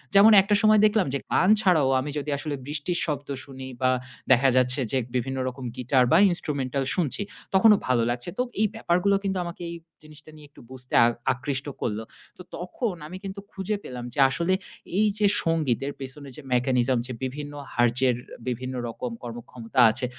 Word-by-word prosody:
যেমন 205 +3 +8
একটা 205 +2 +1
সময় 215 0 +5
দেখলাম 210 -6 +3
যে, 140 - +1 0.2
গান 185 - +4
ছাড়াও 160 -9 +3
আমি 140 - -3
যদি 145 +1 -4
আসলে 145 0 -4
বৃষ্টির 150 +5 -2
শব্দ 145 -3 -3 0.2
শুনি 130 -1 -9
বা, 130 - +3 0.4
দেখা 130 +1 +6
যাচ্ছে 125 +2 +2
যে, 135 - +1 0.2
বিভিন্ন 130 +2 -1
রকম 130 0 -6
গিটার 130 0 +2
বা, 160 - +7
ইনস্ট্রুমেন্টাল 140 -6 -2
শুনছি, 175 +1 -1 0.3
তখনও 210 +2 +6
ভালো 120 -3 +2
লাগছে। 120 +5 -3
তো 250 - +2 0.2
এই 215 - +4
ব্যাপারগুলো 200 -1 +2
কিন্তু 195 -1 -1
আমাকে 170 +1 -8
এই - - -6 0.3
জিনিসটা 155 0 -15
নিয়ে 150 -1 -14
একটু - - -17
বুঝতে 125 -1 -12
আ - - +5 0.3
আকৃষ্ট 135 +2 -4 0.2
করলো। 110 -1 -2 0.3
তো - - -10 0.2
তখন 220 - -3
আমি 185 +4 -8
কিন্তু 195 0 -6
খুঁজে 195 +2 -3
পেলাম 125 -1 -7
যে, - - -5
আসলে 170 +7 0 0.5
এইযে 210 0 +2 0.2
সংগীতের 145 -5 0
পেছনে 135 +1 -8
যে 150 - -10
mechanism, 125 0 +2
যে 130 - -5
বিভিন্ন 145 +3 -5 0.2
hertz 120 0 +2
এর 125 - +2 0.3
বিভিন্ন 130 +1 -3
রকম 120 +1 -5
কর্মক্ষমতা 120 0 -5
আছে। 125 - -3
140 Hz, 180 wpm, -25 LUFS, 130-180 Hz, 0.5 s, যেমন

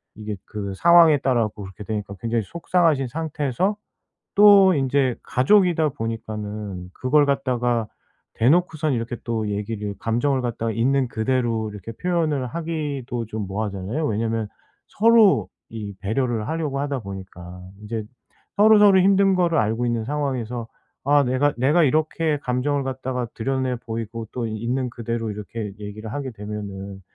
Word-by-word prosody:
이게 105 -1 -5
그 100 -2 -5
상황에 170 - +6
따라 125 -4 +2
갖고 105 -1 -5
그렇게 95 +2 -9
되니까 105 -2 -4
굉장히 115 -1 0
속상하신 165 - +1
상태에서 160 - -1 0.6
또 200 -2 +8
인제 135 -2 +1
가족이다 165 +2 +3
보니까는 105 -5 -5
그걸 145 +3 +3
갖다가 125 -5 0 0.5
대놓고선 155 +3 +2
이렇게 115 0 -3
또 110 -3 -1
얘기를 105 0 -3
감정을 125 +4 0
갖다가 115 -2 -2
있는 130 +3 +1
그대로 115 -2 0
이렇게 105 +2 -8
표현을 155 -5 -1
하기도 145 -7 -4
좀 110 -1 -5
뭐하잖아요. 105 +7 -3
왜냐하면 110 0 -1 0.4
서로 225 -2 +4 0.2
이 105 -3 -6
배려를 110 +2 -1
하려고 155 -4 -2
하다 140 -2 -2
보니까 95 -2 -9 0.2
이제 110 0 -4 0.5
서로서로 205 -2 +7
힘든 195 0 +4
거를 175 -5 +2
알고 110 +3 0
있는 115 -2 -1
상황에서 125 -5 -3 0.4
'아 145 +1 +4
내가 130 +3 +1
내가 150 +7 +3
이렇게 155 +1 +1
감정을 135 +2 -1
갖다가 130 -2 -3
드러내 130 +1 -1
보이고 115 0 -5
또 120 -2 -2
있는 120 +4 -2
그대로 115 -1 -4
이렇게 105 0 -6
얘기를 105 +1 -7
하게 140 -3 -4
되면은 100 -2 -7
120 Hz, 340 characters per minute, -23 LUFS, 110-145 Hz, 0.6 s, 또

